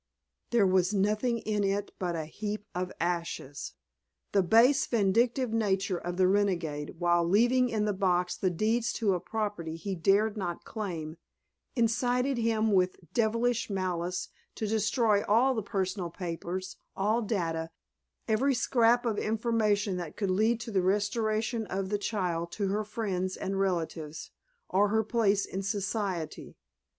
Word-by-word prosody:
There 235 -4 +4
was 185 +1 +2
nothing 215 +5 +1
in 215 -2 -1
it 200 +1 -1
but 175 -2 -1
a 160 -2 -3
heap 210 +5 -5
of 180 +1 -3
ashes. 170 -5 -3 0.6
The 200 - +4
base, 230 +9 +5
vindictive 230 +3 +2
nature 195 -4 +1
of 175 0 -5
the 185 -1 +4
renegade, 175 -7 0
while 175 0 +3
leaving 240 +8 +3
in 215 -2 0
the 210 - +1
box 180 -2 +1
the 185 - 0
deeds 220 +6 0
to 210 -4 +1
a 180 - 0
property 185 -4 -3
he 195 +4 -4
dared 200 +5 +2
not 175 -4 -4
claim, 170 -7 -5 0.6
incited 245 +2 +1
him 225 -1 +1
with 185 -2 +3 0.2
devilish 230 +1 +1
malice 180 -2 -2 0.3
to 220 - -3
destroy 215 0 +2
all 240 +6 +4
the 225 - -1
personal 190 -3 -2
papers, 180 +2 -5 0.2
all 215 +4 +2
data, 165 -7 -2 0.6
every 255 +5 +2
scrap 240 -1 +3
of 220 -3 0
information 215 -3 +1
that 170 -4 -6
could 200 -3 0
lead 220 +5 +2
to 230 - -6
the 190 -3 +2
restoration 215 +3 0
of 190 0 -3
the 205 0 0
child 175 -5 -2
to 200 -2 -1
her 210 +2 0
friends 200 -4 -3
and 195 0 -2
relatives, 165 -5 -2 0.4
or 200 +2 +3
her 220 +1 +2
place 210 -3 +2
in 190 - -4
society. 200 -4 -3
205 Hz, 150 wpm, -29 LUFS, 180-220 Hz, 0.6 s, base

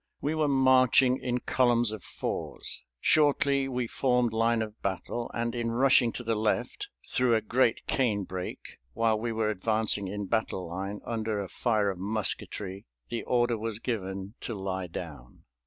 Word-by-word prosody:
We 150 - -1
were 155 -1 +1
marching 130 -1 +5
in 125 0 -2
columns 120 -3 +2
of 110 -3 -7
fours. - - -4 0.2
Shortly, 140 - +3
we 125 -2 -1
formed 125 -1 +1
line 115 0 +2
of 110 0 -9
battle, 100 +5 -3
and 115 0 -2
in 120 -1 -1
rushing 125 0 +4
to 120 - -5
the 115 -1 0
left 110 0 -1 0.2
through 125 -2 +3
a - - +3
great 120 -1 +1
cane 110 -7 +1
brake, 90 -1 -7
while 110 - +2
we 115 +1 -2
were 110 -1 0
advancing 105 0 0
in 100 +1 -4
battle 95 -3 -1
line 95 +4 -5
under 110 -2 -2
a 100 - -3
fire 105 -1 +1
of 90 - -8
musketry, 100 - -3 0.2
the 120 - -2
order 120 -2 +2
was 110 -1 -3
given 100 -4 -4
to 115 - -4
lie 95 -2 -3
down. 75 -7 -9
115 Hz, 165 wpm, -29 LUFS, 100-125 Hz, 0.2 s, marching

